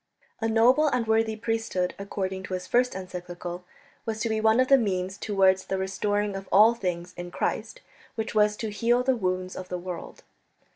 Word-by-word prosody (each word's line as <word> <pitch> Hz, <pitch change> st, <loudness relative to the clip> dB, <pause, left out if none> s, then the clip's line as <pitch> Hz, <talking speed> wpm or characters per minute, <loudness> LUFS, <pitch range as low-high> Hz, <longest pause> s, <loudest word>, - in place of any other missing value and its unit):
A 225 Hz, -, 0 dB
noble 245 Hz, +7 st, +4 dB
and 250 Hz, -5 st, +1 dB
worthy 220 Hz, 0 st, +2 dB
priesthood, 225 Hz, -5 st, -1 dB
according 190 Hz, -1 st, -3 dB
to 185 Hz, -, -3 dB
his 180 Hz, 0 st, -5 dB
first 250 Hz, +3 st, +2 dB
encyclical, 180 Hz, -1 st, -7 dB, 0.4 s
was 220 Hz, -1 st, -3 dB
to 230 Hz, -, 0 dB
be 220 Hz, 0 st, 0 dB
one 220 Hz, +2 st, +4 dB
of 255 Hz, -, +4 dB
the 275 Hz, -, +7 dB
means 190 Hz, -4 st, -1 dB
towards 190 Hz, -2 st, +2 dB
that 190 Hz, -, -2 dB
restoring 205 Hz, +2 st, -1 dB
of 195 Hz, 0 st, -7 dB
all 215 Hz, +4 st, +7 dB
things 180 Hz, -5 st, -4 dB
in 175 Hz, 0 st, -6 dB
Christ -, -, -3 dB, 0.3 s
"which 220 Hz, 0 st, -3 dB
was 210 Hz, -1 st, +3 dB
to 220 Hz, -2 st, -4 dB
heal 235 Hz, +4 st, +2 dB
the 260 Hz, 0 st, +2 dB
wounds 185 Hz, -3 st, -2 dB
of 185 Hz, -1 st, -7 dB
the 180 Hz, -, -2 dB
world." 175 Hz, -1 st, -7 dB
205 Hz, 190 wpm, -26 LUFS, 185-225 Hz, 0.4 s, the